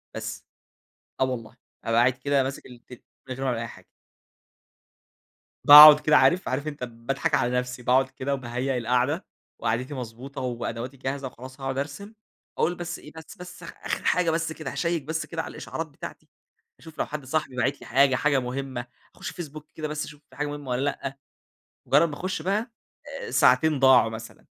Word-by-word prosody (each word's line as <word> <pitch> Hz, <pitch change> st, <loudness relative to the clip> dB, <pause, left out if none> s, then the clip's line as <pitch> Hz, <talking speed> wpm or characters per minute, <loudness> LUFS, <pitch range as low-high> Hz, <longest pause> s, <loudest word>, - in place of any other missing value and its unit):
بس، -, -, -6 dB, 0.8 s
آه -, -, +5 dB
والله. 120 Hz, -2 st, -5 dB, 0.3 s
أبقى 115 Hz, +1 st, +3 dB
قاعد 125 Hz, +2 st, +4 dB
كده 135 Hz, +2 st, +1 dB
ماسك 135 Hz, +1 st, -5 dB
التل 125 Hz, 0 st, -13 dB, 0.3 s
من 130 Hz, -, -4 dB
غير 135 Hz, +2 st, -5 dB
ولا 120 Hz, -3 st, 0 dB
أي 115 Hz, -, -3 dB
حاجة. -, -, -13 dB, 1.8 s
باقعد 150 Hz, +1 st, +12 dB
كده 150 Hz, 0 st, +4 dB
عارف، 185 Hz, +3 st, +3 dB
عارف 145 Hz, +4 st, -2 dB
أنت 145 Hz, -4 st, -5 dB
باضحك 120 Hz, +3 st, -3 dB
على 120 Hz, -, +2 dB
نفسي. 125 Hz, 0 st, -6 dB
باقعد 130 Hz, +2 st, +3 dB
كده 135 Hz, +1 st, -3 dB
وباهيأ 130 Hz, 0 st, -2 dB
القاعدة، 125 Hz, -, 0 dB, 0.3 s
وقعدتي 120 Hz, +5 st, -1 dB
مضبوطة 130 Hz, +2 st, -7 dB
وأدواتي 120 Hz, +1 st, -4 dB
جاهزة 135 Hz, +1 st, -3 dB
وخلاص 130 Hz, +2 st, -11 dB
هاقعد 135 Hz, 0 st, -3 dB
أرسم، 180 Hz, +10 st, -5 dB, 0.4 s
أقول 175 Hz, +2 st, +1 dB
بس 175 Hz, 0 st, -5 dB
إيه 150 Hz, -, -13 dB
بس 160 Hz, -1 st, -11 dB
بس 180 Hz, -1 st, -11 dB
آخر 165 Hz, -, -5 dB
حاجة، 180 Hz, -2 st, +3 dB
بس 165 Hz, 0 st, -1 dB
كده 160 Hz, 0 st, -6 dB
هاشيك 170 Hz, -3 st, -1 dB
بس 160 Hz, +2 st, -3 dB
كده -, -, -4 dB
على -, -, -8 dB
الإشعارات -, -, -5 dB
بتاعتي، -, -, -10 dB, 0.5 s
أشوف 160 Hz, -1 st, -14 dB
لو -, -, +1 dB
حد 150 Hz, -3 st, -6 dB
صاحبي 140 Hz, -2 st, -2 dB
باعت 130 Hz, +4 st, -1 dB
لي -, -, -11 dB
حاجة، 135 Hz, +2 st, +4 dB
حاجة 140 Hz, 0 st, +2 dB
مهمة، 130 Hz, 0 st, -4 dB, 0.3 s
اخش -, -, -6 dB
فيسبوك 155 Hz, -3 st, -8 dB
كده 155 Hz, -1 st, -4 dB
بس 150 Hz, 0 st, -3 dB
أشوف 150 Hz, -1 st, -13 dB
في -, -, -18 dB
حاجة 150 Hz, 0 st, -2 dB
مهمة 145 Hz, -2 st, -7 dB
والَّا 125 Hz, +2 st, 0 dB
لأ. 135 Hz, -1 st, -5 dB, 0.7 s
مجرد 165 Hz, +2 st, +4 dB
ما 145 Hz, -, -6 dB
أخش 185 Hz, 0 st, -3 dB
بقى، 210 Hz, +7 st, -1 dB, 0.5 s
آآ، -, -, -7 dB
ساعتين 135 Hz, +3 st, +4 dB
ضاعوا 130 Hz, -4 st, +6 dB
مثلًا، 110 Hz, 0 st, -10 dB
135 Hz, 180 wpm, -26 LUFS, 125-155 Hz, 1.8 s, باقعد